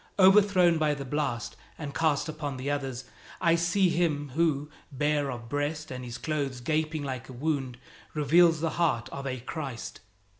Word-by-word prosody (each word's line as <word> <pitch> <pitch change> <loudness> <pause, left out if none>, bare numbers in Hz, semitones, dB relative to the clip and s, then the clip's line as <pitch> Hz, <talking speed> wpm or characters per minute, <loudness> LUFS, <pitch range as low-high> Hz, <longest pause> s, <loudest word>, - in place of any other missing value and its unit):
Overthrown 190 -3 +6
by 150 -1 +2
the 140 -1 -6
blast 125 -5 -2 0.2
and 145 -3 -6
cast 155 -1 +1
upon 150 -3 -4
the 135 +3 -2
others, 135 -3 -3 0.4
I 170 -2 +4
see 170 +3 +3
him 155 -4 0
who, 150 0 +1 0.2
bare 145 +1 0
of 120 -2 -6
breast 145 +3 -2
and 125 0 -5
his 120 0 -6
clothes 140 -5 -2
gaping 155 +3 -1
like 130 -3 -5
a - - -8
wound, 135 -2 -2 0.4
reveals 165 +2 +4
the 165 -1 0
heart 130 -9 +1
of 140 0 -6
a 130 -2 -3
Christ. 135 -3 -6
145 Hz, 165 wpm, -28 LUFS, 135-160 Hz, 0.4 s, Overthrown